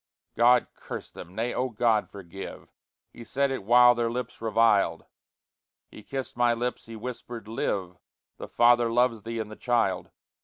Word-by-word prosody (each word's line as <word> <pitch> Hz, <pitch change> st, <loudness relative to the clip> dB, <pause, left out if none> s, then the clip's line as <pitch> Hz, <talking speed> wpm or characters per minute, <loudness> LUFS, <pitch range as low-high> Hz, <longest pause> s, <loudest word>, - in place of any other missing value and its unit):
God 120 Hz, +1 st, +5 dB
curse -, -, -8 dB
them! 90 Hz, -, -11 dB
Nay, 115 Hz, +3 st, -1 dB
Oh 130 Hz, +1 st, -1 dB
God 110 Hz, -1 st, +1 dB
forgive! 95 Hz, -1 st, -9 dB, 0.4 s
He 120 Hz, -, -10 dB
said 140 Hz, +3 st, 0 dB
it 130 Hz, -, -4 dB
while 120 Hz, +3 st, +7 dB
their 120 Hz, -1 st, -1 dB
lips 125 Hz, 0 st, -5 dB
reviled; 110 Hz, -6 st, +2 dB, 0.9 s
He -, -, -11 dB
kissed 135 Hz, +4 st, -6 dB
my 120 Hz, -1 st, +3 dB
lips, 120 Hz, 0 st, -4 dB
he 115 Hz, -, -8 dB
whispered: 120 Hz, -1 st, -7 dB
"Live! 95 Hz, -5 st, -3 dB, 0.4 s
The -, -, -7 dB
father 120 Hz, -1 st, +4 dB
loves 120 Hz, -2 st, +2 dB
thee 115 Hz, +2 st, -5 dB
in 110 Hz, -1 st, -4 dB
the 110 Hz, -, -9 dB
child." 115 Hz, -7 st, 0 dB
115 Hz, 160 wpm, -27 LUFS, 110-120 Hz, 0.9 s, while